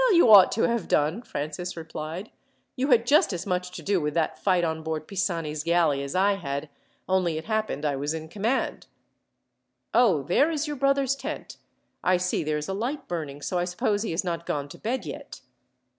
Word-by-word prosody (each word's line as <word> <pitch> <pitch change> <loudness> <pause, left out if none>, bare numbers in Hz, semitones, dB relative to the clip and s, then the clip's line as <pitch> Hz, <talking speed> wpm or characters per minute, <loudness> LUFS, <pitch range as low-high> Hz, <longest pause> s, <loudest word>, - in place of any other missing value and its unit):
"Well, - - +4
you 245 -10 +6
ought 195 -3 +9
to 225 - +1
have 235 -5 0
done," 155 +9 +1
Francis 175 -4 -5
replied. 160 +4 -6 0.4
"You 265 +1 0
had 240 -4 +4
just 285 -5 +4
as 175 - -4
much 180 -2 -1
to - - -8
do 195 -3 +1
with 150 0 -2
that 165 -2 0
fight 185 -3 +2
on 160 -1 -1
board 160 -1 -4
Pisani's 165 -6 -2
galley 165 -4 +2
as 140 +3 -5
I 195 +2 +3
had, 140 -3 -4 0.4
only 185 -4 +1
it 160 - -6
happened 215 -9 -1
I 145 -2 +1
was 145 +2 -2
in 160 0 -6
command. 215 +9 -1 1.1
"Oh, 195 - +4
there 275 - +3
is 310 -2 -1
your 295 -1 -3
brother's 275 0 +2
tent! 275 - -6 0.5
I 185 0 +4
see 180 -1 -1
there 155 0 -1
is 150 - -4
a 190 - -2
light 260 +8 -3
burning, 145 -4 -5
so 180 - -1
I 175 - 0
suppose 205 +3 0
he 225 - -2
has 165 +4 -1
not 170 -2 -3
gone 145 -1 -2
to - - -11
bed 250 +4 -2
yet." - - -8
180 Hz, 205 wpm, -26 LUFS, 155-225 Hz, 1.1 s, ought